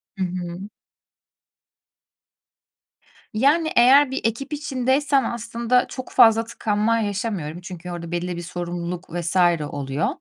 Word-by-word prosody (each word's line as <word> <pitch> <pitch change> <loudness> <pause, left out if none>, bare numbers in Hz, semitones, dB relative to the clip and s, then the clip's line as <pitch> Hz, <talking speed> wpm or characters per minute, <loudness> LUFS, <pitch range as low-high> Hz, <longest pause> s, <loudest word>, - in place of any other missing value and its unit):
Hı 190 - -2
hı. 180 +2 -6 2.6
Yani, 300 +8 +2
eğer 260 +3 +6
bir 265 - -2
ekip 255 +6 -2
içindeysem 275 -1 +1
aslında 235 +1 0
çok 255 -1 -8
fazla 225 0 +6
tıkanma 225 0 0
yaşamıyorum, 200 -6 -3
çünkü 180 -1 -8
orada 170 -1 -6
belli 175 +1 -2
bir - - -4
sorumluluk 175 +1 -5
vs. 175 0 -3 0.3
oluyor. 140 +1 -2
210 Hz, 110 wpm, -22 LUFS, 175-250 Hz, 2.6 s, eğer